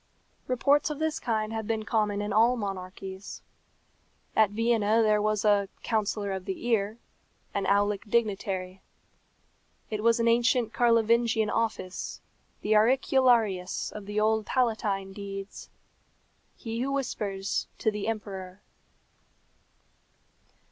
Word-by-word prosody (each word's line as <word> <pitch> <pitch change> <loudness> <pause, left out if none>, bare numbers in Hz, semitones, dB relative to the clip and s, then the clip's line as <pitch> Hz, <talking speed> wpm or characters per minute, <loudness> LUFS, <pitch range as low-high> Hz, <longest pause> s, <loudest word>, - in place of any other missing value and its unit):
Reports 280 +4 +2
of 300 - -4
this 315 +1 -1
kind 220 -4 -1
have 220 -1 -4
been 220 -1 -1
common 210 -2 0
in 205 -1 -3
all 230 +4 +4
monarchies. 190 -1 -6 0.9
At 215 -2 +5
Vienna 225 0 +2
there 210 -1 +3
was 215 0 0
"a 200 -2 +3
counsellor 210 -2 -1
of 190 -1 -4
the 195 +3 -5
ear" 220 -2 +1 0.6
an 200 - -1
aulic 205 +1 +1
dignitary. 195 -4 -1 1.1
It 215 -1 -2
was 230 +1 +3
an 230 - +2
ancient 235 0 +2
Carlovingian 230 -2 +3
office 215 -5 -3 0.4
the 215 - +2
auricularius 230 -5 +2
of 205 -2 -9
the 205 +1 -1
old 220 0 +1
palatine 215 -6 0
deeds. 195 0 -7 0.9
He 230 -1 -5
who 270 +2 -1
whispers 200 -8 -2
to 220 - +1
the 210 0 -4
emperor. 195 -3 -5
215 Hz, 120 wpm, -28 LUFS, 200-230 Hz, 1.1 s, At